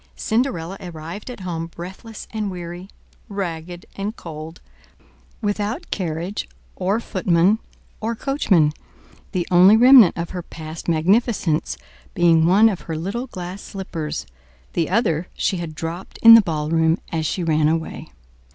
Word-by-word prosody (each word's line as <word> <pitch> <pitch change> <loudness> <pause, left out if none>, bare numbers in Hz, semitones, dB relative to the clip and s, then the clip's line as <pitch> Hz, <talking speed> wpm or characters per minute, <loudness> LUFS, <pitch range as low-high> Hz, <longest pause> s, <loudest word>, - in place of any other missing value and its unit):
Cinderella 220 -7 -1
arrived 170 +4 -8
at 245 -5 -8
home 165 -3 -4
breathless 190 +7 -9
and 215 -2 -2
weary, 175 +1 -7 0.4
ragged 175 -3 -5
and 205 +3 -4
cold, 160 0 -9 0.8
without 210 - -2
carriage, 175 +2 -3 0.3
or 195 +4 0
footman 185 -1 +2 0.4
or 225 +2 -2
coachman; 195 - +2 0.6
the 175 -2 -2
only 185 +4 +7
remnant 245 -6 +8
of 170 0 -4
her 180 - -4
past 160 -1 -9
magnificence 170 -1 +1 0.4
being 165 -2 +4
one 200 +5 +6
of 195 -5 -1
her 160 - -2
little 205 +10 -3
glass 185 -2 -7
slippers—the 70 - -6
other 180 -5 +1
she 190 - 0
had 165 -3 -6
dropped 165 +3 -6
in 230 0 +11
the 230 - +10
ballroom 160 -1 +1
as 160 -2 -1
she 180 - -2
ran 155 -2 +2
away. 160 +1 -2
175 Hz, 135 wpm, -21 LUFS, 160-205 Hz, 0.8 s, in